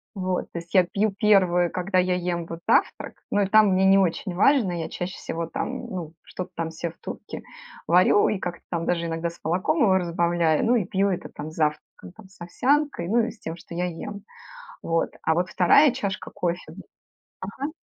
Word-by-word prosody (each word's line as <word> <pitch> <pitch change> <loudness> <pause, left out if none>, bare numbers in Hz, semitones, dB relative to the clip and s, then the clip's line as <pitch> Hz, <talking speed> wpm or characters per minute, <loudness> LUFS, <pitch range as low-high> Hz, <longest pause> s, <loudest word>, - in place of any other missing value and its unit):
Вот. 185 -2 -2
То 170 - -4
есть 170 0 -14
я 185 -2 +6
пью 205 +4 0
1, 185 -4 +3
когда 185 +1 -1
я 180 0 +2
ем 175 -1 -2
вот 165 0 -7
завтрак. - - +1 0.2
Но 205 - +2
и 195 - +1
там 215 +1 +6
мне 190 0 +3
не 195 0 +6
очень 185 0 0
важно. 215 -1 +3
Я 160 - -5
чаще 180 +2 -5
всего 165 0 -5
там, 245 +8 -4
ну, 175 -6 -6
что-то 185 0 -7
там 165 -1 -3
се 165 +1 -4
в - - -26
турке - - -8 0.5
варю 180 +4 +5
и 210 - 0
как-то 175 -2 -5
там 170 -1 -2
даже 170 -1 0
иногда 165 +1 -2
с 170 - -15
молоком 185 - 0
его 190 -4 +4
разбавляю, 170 -2 +1
ну 240 +2 +3
и 220 -6 +1
пью 195 +2 +1
это 185 -1 -3
там 150 +1 -8
с - - -14
завтраком, 150 +2 -3 0.2
с 190 -1 -23
овсянкой, 265 - 0
ну 225 +6 +2
и - - -5
с 230 - -18
тем, 160 - -6
что 170 - -12
я 175 +1 -1
ем. 195 +4 -6 0.6
Вот. 165 0 0
А 160 - +2
вот 180 +3 -1
2 220 - +5
чашка 200 -7 -4
кофе 175 -2 -3 0.8
Ага. 280 +6 -4
180 Hz, 205 wpm, -24 LUFS, 170-200 Hz, 0.8 s, я